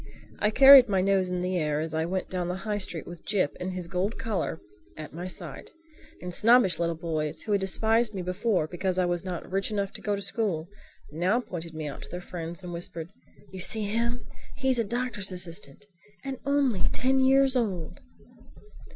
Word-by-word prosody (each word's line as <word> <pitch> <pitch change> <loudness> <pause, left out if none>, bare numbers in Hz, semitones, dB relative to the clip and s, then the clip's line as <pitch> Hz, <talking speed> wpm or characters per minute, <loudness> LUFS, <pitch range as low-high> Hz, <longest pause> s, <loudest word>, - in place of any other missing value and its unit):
I 210 - +3
carried 265 +1 +9
my 195 -2 +2
nose 190 -1 +2
in 180 0 -2
the 180 0 0
air 150 -2 0
as 160 0 -3
I 160 0 0
went 185 +1 -2
down 180 -2 -3
the 180 - -2
High 210 -1 -1
Street 175 -4 -3
with 175 -1 -10
Jip 185 -8 +1
in 180 - -3
his 180 -2 -4
gold 190 +4 -1
collar 205 -7 -2 0.4
at 155 -2 -8
my 175 +3 -5
side; 170 -6 -6 0.5
and 180 0 -4
snobbish 215 -5 +4
little 170 -1 0
boys 155 -2 -3
who 215 - -4
had 200 -1 +2
despised 220 +3 +2
me 185 - -3
before 180 0 0
because 180 +3 -2
I 185 - +3
was 175 0 -1
not 180 -3 -5
rich 195 +1 0
enough 200 -2 -2
to - - -9
go 205 -1 0
to 200 - -5
school 185 -9 0 0.4
now 180 +9 +1
pointed 170 -8 -7
me 155 -1 -4
out 140 - -7
to - - -10
their 180 - -5
friends 175 0 -7
and 175 -1 -6
whispered, 170 0 -6 0.4
"You 190 - -8
see 215 +4 +1
him? 235 +4 -1 0.3
He's 265 -2 +1
a - - +3
doctor's 230 -3 -2
assistant—and 185 - -6
only 275 -8 +2
ten 265 +1 +2
years 270 0 +4
old!" 190 -10 -2
185 Hz, 195 wpm, -27 LUFS, 170-220 Hz, 0.5 s, carried